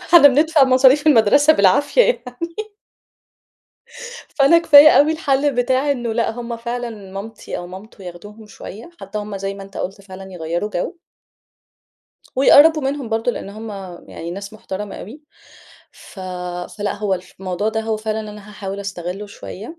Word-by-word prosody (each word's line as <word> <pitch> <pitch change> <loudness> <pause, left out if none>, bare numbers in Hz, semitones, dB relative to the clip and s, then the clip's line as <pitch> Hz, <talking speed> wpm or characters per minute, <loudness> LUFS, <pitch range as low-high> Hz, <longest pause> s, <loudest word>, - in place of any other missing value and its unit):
إحنا 345 - +6
بندفع 300 +2 +4
مصاريف 265 +3 +4
المدرسة 285 +3 +5
بالعافية 285 - +3
يعني 335 - -3 1.8
فأنا 285 +5 +6
كفاية 300 -3 +8
أوي 305 +1 +5
الحل 285 -3 0
بتاع 260 +3 +1
إنه 240 -5 -2
لأ، 230 0 0
هُم 235 0 -6
فعلًا 240 +1 -4 0.2
مامتي 210 +3 -7
أو 175 - -7
مامته 195 +3 -12
ياخدوهم 205 +5 -11
شويَّة، 215 - -11
حتى 195 +2 -6
هُم- 205 -1 -6
زي 195 0 -4
ما 200 - -9
أنت 195 0 -13
قُلت- 195 +2 -5
فعلًا 190 -1 -11
يغيّروا 170 +4 -3
جو. 335 - -4 1.4
ويقرَّبوا 300 +3 +6
منهم 270 -3 -3
برضه، 225 +2 0
لأن - - -7
هُم 220 +2 -8 0.4
يعني 170 +1 -7
ناس 200 +3 -7
مُحترمَة 210 -2 -7
أوي. 275 +10 -10 0.7
ف 190 - -14 0.6
فلأ، 205 0 -2
هو 205 -2 -1
الف 185 0 -10
الموضوع 190 +3 -2
ده 220 0 -2
هو 220 -1 -2
فعلًا 215 0 -3
أنا 210 -1 -10
هاحاول 200 -1 -6
أستغلُّه 195 +1 -6
شويَّة. 210 - -10
220 Hz, 150 wpm, -19 LUFS, 195-275 Hz, 1.8 s, كفاية